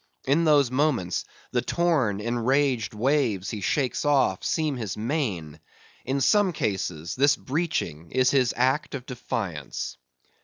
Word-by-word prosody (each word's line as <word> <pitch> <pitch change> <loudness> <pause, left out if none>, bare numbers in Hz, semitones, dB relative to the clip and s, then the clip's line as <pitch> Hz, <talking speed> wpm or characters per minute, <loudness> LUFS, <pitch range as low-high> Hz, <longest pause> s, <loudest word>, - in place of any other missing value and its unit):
In 150 +5 +3
those 145 -5 +4
moments, 130 - 0 0.3
the - - +1
torn, 145 - +1
enraged 120 0 +1
waves 115 -5 +1
he 105 - -5
shakes 130 +6 0
off, 135 -10 +2
seem 155 -3 0
his 110 -6 -4
mane; 105 - -2 0.5
in 135 +2 -1
some 195 +7 +3
cases, 90 - -2
this 140 +3 +4
breaching 130 - -3
is 130 0 +3
his 130 -4 +3
act 130 +4 +1
of 130 -2 -7
defiance. 95 - -4
125 Hz, 130 wpm, -26 LUFS, 105-145 Hz, 0.5 s, those